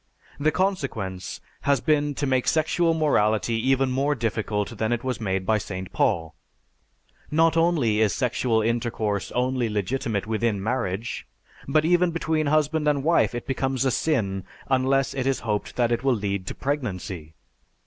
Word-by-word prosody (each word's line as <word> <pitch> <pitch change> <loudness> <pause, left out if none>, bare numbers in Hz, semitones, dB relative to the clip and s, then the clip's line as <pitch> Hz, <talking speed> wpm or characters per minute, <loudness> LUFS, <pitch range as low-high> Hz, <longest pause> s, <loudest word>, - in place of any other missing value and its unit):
The 150 +2 +3
consequence 135 - -2 0.2
has 140 -2 +2
been 145 +1 +1
to 145 - -1
make 130 -2 +1
sexual 165 +1 +2
morality 115 -8 +2 0.2
even 135 -1 +3
more 140 +3 +1
difficult 110 -3 -2
than 110 +1 0
it 120 0 -1
was 130 -2 -3
made 95 -3 -1
by 110 +1 +2
St. 95 -1 -6
Paul. 85 -8 +1 1.0
Not 165 +2 +3
only 160 -11 +2
is 105 -2 +3
sexual 120 -3 +1
intercourse 115 -3 -1
only 125 -1 0
legitimate 105 0 -1
within 110 0 0
marriage, 110 -1 -2 0.4
but 155 +3 +2
even 175 +1 +4
between 160 -2 0
husband 155 +1 +2
and 145 -2 +2
wife 165 -5 +3
it 120 - -4
becomes 135 0 -1
a 130 - +3
sin 100 - 0 0.3
unless 135 +1 +2
it 135 -1 -2
is 135 - 0
hoped 105 -3 -2
that 120 -1 +1
it 120 +1 0
will 135 -2 +3
lead 100 -3 -3
to - - -4
pregnancy. 95 - -4
125 Hz, 160 wpm, -25 LUFS, 105-145 Hz, 1.0 s, even